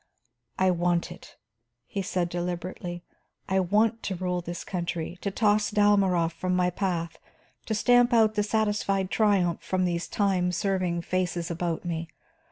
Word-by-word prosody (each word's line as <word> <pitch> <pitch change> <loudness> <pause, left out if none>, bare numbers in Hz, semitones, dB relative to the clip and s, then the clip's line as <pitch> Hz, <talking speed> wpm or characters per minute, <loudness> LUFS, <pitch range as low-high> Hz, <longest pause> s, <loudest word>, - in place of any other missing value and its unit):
"I 185 0 +3
want 175 -1 0
it," - - -13 0.5
he 200 - -4
said 180 -2 -1
deliberately. 175 0 -4 0.4
"I 190 0 +2
want 215 +5 +2
to 190 - -3
rule 180 0 -2
this 175 0 -6
country, 175 -1 -4
to 200 - -1
toss 210 +1 +2
Dalmorov 195 -5 +3
from 180 +2 -1
my 180 0 +2
path, 175 -3 -2 0.5
to 220 - 0
stamp 245 +3 +4
out 220 -2 +4
the 210 - +1
satisfied 205 -3 0
triumph 195 -6 +2
from 185 -1 0
these 170 -1 -1
time 190 -3 +1
serving 180 -2 -1
faces 175 -2 -1
about 170 0 -2
me. 165 -1 -3
185 Hz, 150 wpm, -27 LUFS, 175-205 Hz, 0.5 s, stamp